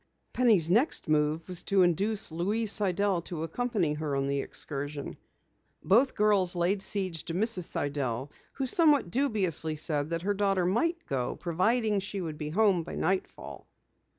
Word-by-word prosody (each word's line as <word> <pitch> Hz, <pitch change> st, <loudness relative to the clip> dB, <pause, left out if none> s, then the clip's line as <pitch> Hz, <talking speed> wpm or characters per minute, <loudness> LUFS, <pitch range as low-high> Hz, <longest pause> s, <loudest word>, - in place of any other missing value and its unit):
Penny's 210 Hz, -10 st, +3 dB
next 240 Hz, -, +2 dB
move 155 Hz, +1 st, 0 dB
was 180 Hz, -2 st, -1 dB
to 195 Hz, -2 st, +3 dB
induce 195 Hz, +3 st, +1 dB
Louise 205 Hz, +6 st, -1 dB
Sidell 200 Hz, -3 st, +1 dB
to 160 Hz, -3 st, -5 dB
accompany 195 Hz, -2 st, -1 dB
her 150 Hz, -2 st, -3 dB
on 135 Hz, 0 st, 0 dB
the 140 Hz, 0 st, -1 dB
excursion. 145 Hz, 0 st, -5 dB, 0.7 s
Both 240 Hz, +8 st, +3 dB
girls 200 Hz, -4 st, +2 dB
laid 180 Hz, +3 st, 0 dB
siege 185 Hz, -6 st, -1 dB
to 165 Hz, -, -5 dB
Mrs. 200 Hz, -2 st, +3 dB
Sidell 140 Hz, -3 st, -3 dB, 0.2 s
who 270 Hz, -, -3 dB
somewhat 290 Hz, -, +3 dB
dubiously 190 Hz, -, 0 dB
said 150 Hz, -1 st, 0 dB
that 165 Hz, 0 st, -3 dB
her 205 Hz, +2 st, 0 dB
daughter 195 Hz, -2 st, +1 dB
might 330 Hz, -, 0 dB
go, 130 Hz, -3 st, -2 dB
providing 210 Hz, +5 st, 0 dB
she 200 Hz, +1 st, -5 dB
would 160 Hz, -4 st, -6 dB
be 150 Hz, -1 st, -4 dB
home 195 Hz, 0 st, +2 dB
by 165 Hz, -, -8 dB
nightfall. 190 Hz, +2 st, -3 dB
180 Hz, 155 wpm, -28 LUFS, 155-210 Hz, 0.7 s, Penny's